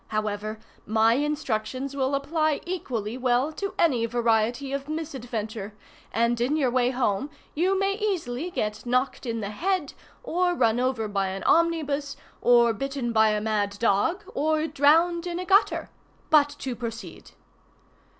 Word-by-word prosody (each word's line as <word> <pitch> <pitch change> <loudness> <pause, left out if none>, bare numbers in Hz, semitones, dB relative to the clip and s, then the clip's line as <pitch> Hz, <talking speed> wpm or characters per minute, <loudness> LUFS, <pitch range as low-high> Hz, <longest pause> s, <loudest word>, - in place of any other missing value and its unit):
However, 215 0 -3 0.3
my 220 +1 +4
instructions 270 -2 -2
will 270 0 0
apply 305 +1 0
equally 255 - -4
well 255 +3 +2
to 395 +5 -5
any 250 -9 +2
variety 235 +3 +1
of 275 +1 -4
misadventure, 235 -9 -5 0.4
and 235 +1 +1
in 275 +6 +1
your 265 -5 +1
way 250 0 +2
home 250 0 0 0.2
you 370 +5 +1
may 390 +1 +1
easily 360 - -2
get 215 -9 -3
knocked 255 +1 0
in 230 -1 -2
the 200 0 -4
head, 350 - -1 0.3
or 360 -5 +1
run 235 -5 +2
over 250 -3 0
by 200 -2 -1
an 190 +1 -5
omnibus, 305 -4 +1 0.2
or 235 -1 +5
bitten 270 +1 -3
by 220 -1 +5
a 210 0 +1
mad 205 -2 -1
dog, 230 - +1
or 310 +1 +1
drowned 335 +4 +3
in 345 -1 -3
a 365 - -4
gutter. 395 +3 +2 0.4
But 295 -2 +6
to 255 -2 -4
proceed. 225 -7 -7
255 Hz, 150 wpm, -26 LUFS, 225-310 Hz, 0.4 s, But